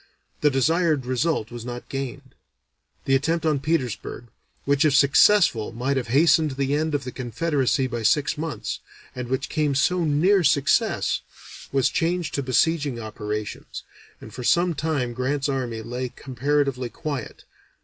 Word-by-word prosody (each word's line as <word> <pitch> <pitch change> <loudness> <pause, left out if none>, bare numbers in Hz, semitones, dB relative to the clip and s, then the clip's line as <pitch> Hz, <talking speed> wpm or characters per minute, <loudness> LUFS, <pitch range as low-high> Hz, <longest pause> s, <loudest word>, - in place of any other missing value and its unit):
The 150 - +4
desired 155 +1 +1
result 130 -2 -1
was 120 -1 -7
not 120 0 -7
gained; 135 0 -6 0.7
the 135 - +1
attempt 160 +5 +1
on 150 -3 +2
Petersburg, 130 -5 -3 0.4
which 140 0 +3
if 150 -3 +3
successful 140 - +4
might 130 +4 -1
have 130 -3 -2
hastened 150 +3 +4
the 140 0 0
end 155 +1 0
of 140 - -2
the 125 - -6
Confederacy 135 +2 0
by 120 -2 -3
six 140 +8 +2
months, 160 0 -4 0.4
and 125 -1 -5
which 130 +1 -2
came 150 -3 0
so 175 +6 +2
near 175 +6 +3
success, 145 - +2 0.5
was 135 -2 +2
changed 170 -2 -1
to 140 - -1
besieging 140 0 +1
operations, 105 -1 -5 0.4
and - - -12
for 125 - -7
some 175 +7 +3
time 140 -5 -2
Grant's 135 +3 -1
army 125 -5 -3
lay 125 +2 -4
comparatively 135 0 -1
quiet. 140 -2 -6
140 Hz, 150 wpm, -24 LUFS, 125-155 Hz, 0.7 s, The